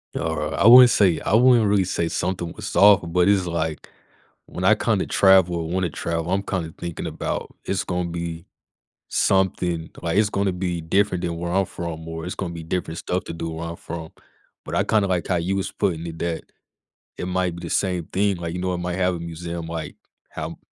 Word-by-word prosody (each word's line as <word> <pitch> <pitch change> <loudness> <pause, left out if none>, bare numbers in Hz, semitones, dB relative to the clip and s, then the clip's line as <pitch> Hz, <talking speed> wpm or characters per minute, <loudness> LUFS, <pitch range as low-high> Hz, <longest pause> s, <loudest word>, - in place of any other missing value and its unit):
Alri 75 -1 -2
I - - +1
wouldn't 125 +1 +10
say 95 -8 +3
I - - -1
wouldn't 120 -1 +5
really 100 -1 +3
say 85 -2 -1
something 90 -1 -2
was - - -7
off, 100 0 +7
but 85 +2 +1
it's, 100 -3 +3
like, 80 -2 -3 0.6
when 90 - -7
I 110 +3 +6
kinda 105 -3 0
travel 95 -3 +4
or 80 -1 -4
wanna 90 0 0
travel, 85 +2 -3
I'm 100 +1 +1
kinda 85 -5 -3
thinking 85 -2 -5
about - - -4
it's 95 - -1
gonna 90 -1 -2
be 85 0 -5 0.6
something 90 -3 +1
like, 85 +3 -1
it's 105 -1 +4
gonna 100 -1 0
be 90 -1 -2
different 90 +2 +1
than 85 -1 -2
where 85 0 -3
I'm 95 +2 +2
from 80 -2 -6
or 80 0 -6
it's 90 - -5
gonna 85 -3 -4
be 85 - -7
different 85 0 -3
stuff 90 +1 -2
to - - -6
do 85 0 -4
where 80 +1 -5
I'm 85 - -5
from. 80 -2 -7 0.5
But - - -5
I - - +3
kinda 105 -3 +2
like 90 -3 -1
how 90 - +1
you 90 +4 -1
was 95 - -2
putting 85 -5 -1
it 80 -1 -8
that 85 -1 -2 0.7
it - - -4
might 90 -1 -1
be 85 - -9
the - - -7
same 90 -3 0
thing. 100 0 0
Like, 85 -1 -5
you 90 - -4
know, 90 0 -1
it - - -2
might 90 0 -3
have 90 -1 +1
a - - -6
museum, 85 0 -6
like, 80 -1 -5 0.3
how - - -6
90 Hz, 215 wpm, -23 LUFS, 85-95 Hz, 0.7 s, wouldn't